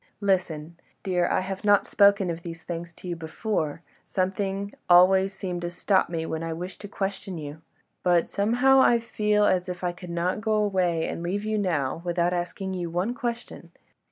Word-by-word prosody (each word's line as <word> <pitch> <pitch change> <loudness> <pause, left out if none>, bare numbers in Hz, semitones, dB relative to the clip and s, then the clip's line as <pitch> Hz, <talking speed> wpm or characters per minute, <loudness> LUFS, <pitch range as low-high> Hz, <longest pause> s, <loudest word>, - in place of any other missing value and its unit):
Listen, 175 -5 -1 0.2
dear, 180 -3 +1
I - - +1
have 190 +1 -5
not 205 -1 +4
spoken 200 -2 +4
of 165 0 -6
these 165 -1 -8
things 170 0 -5
to 180 - -11
you 175 - -2
before; 165 -1 -3 0.2
something 195 +1 -2 0.2
always 190 +2 +6
seemed 185 -2 -5
to 175 - -3
stop 185 +2 +1
me 165 -1 -3
when 160 0 -3
I 165 0 -3
wished 180 +3 -7
to 205 - -7
question 195 -2 -4
you. 150 0 -7 0.4
But, 175 -2 +2
somehow, 245 +6 +4
I 240 -2 +6
feel 210 -2 +1
as 185 -2 +1
if 180 0 -6
I 175 - +1
could 180 0 -11
not 175 +4 -1
go 220 0 0
away 185 -6 +1
and - - -4
leave 195 +5 -2
you 215 0 0
now 165 -6 -1
without 175 0 0
asking 185 +2 -3
you 175 -2 -3
one 180 +8 -1
question. 240 -2 -5
185 Hz, 185 wpm, -26 LUFS, 170-200 Hz, 0.4 s, always